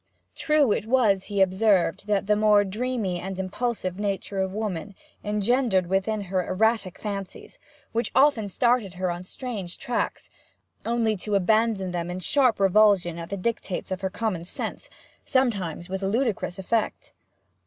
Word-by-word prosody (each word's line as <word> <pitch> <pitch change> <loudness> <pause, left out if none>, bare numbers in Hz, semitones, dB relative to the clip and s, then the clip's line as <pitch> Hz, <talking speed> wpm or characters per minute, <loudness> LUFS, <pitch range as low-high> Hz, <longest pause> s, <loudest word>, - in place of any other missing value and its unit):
True 300 -6 +3
it 215 - -1
was, 220 -6 +3
he 200 -2 -1
observed, 190 -1 +2
that 205 -2 +1
the 210 +1 +3
more 210 -1 +5
dreamy 210 -2 -2
and 190 +1 -5
impulsive 190 -1 -2
nature 200 -1 -2
of 190 0 0
woman 205 -2 -4 0.3
engendered 210 -1 +1
within 195 +4 0
her 185 -1 -1
erratic 210 0 0
fancies, 200 -3 -6 0.3
which 230 +1 -1
often 260 -6 +4
started 235 -3 +1
her 185 0 -1
on 175 +1 -5
strange 200 -3 -6
tracks, 240 - -3 0.6
only 230 -2 +1
to 205 +2 -2
abandon 205 -1 +2
them 175 -1 -3
in 180 - -4
sharp 250 +4 +2
revulsion 195 -3 +4
at 165 - -7
the 200 - -3
dictates 195 -2 -3
of 185 0 -3
her 190 - -1
common 200 -4 -2
sense 175 - -4 0.3
sometimes 200 - 0
with 190 +1 -4
ludicrous 205 -2 -1
effect. 215 +4 -2
200 Hz, 150 wpm, -25 LUFS, 185-225 Hz, 0.6 s, more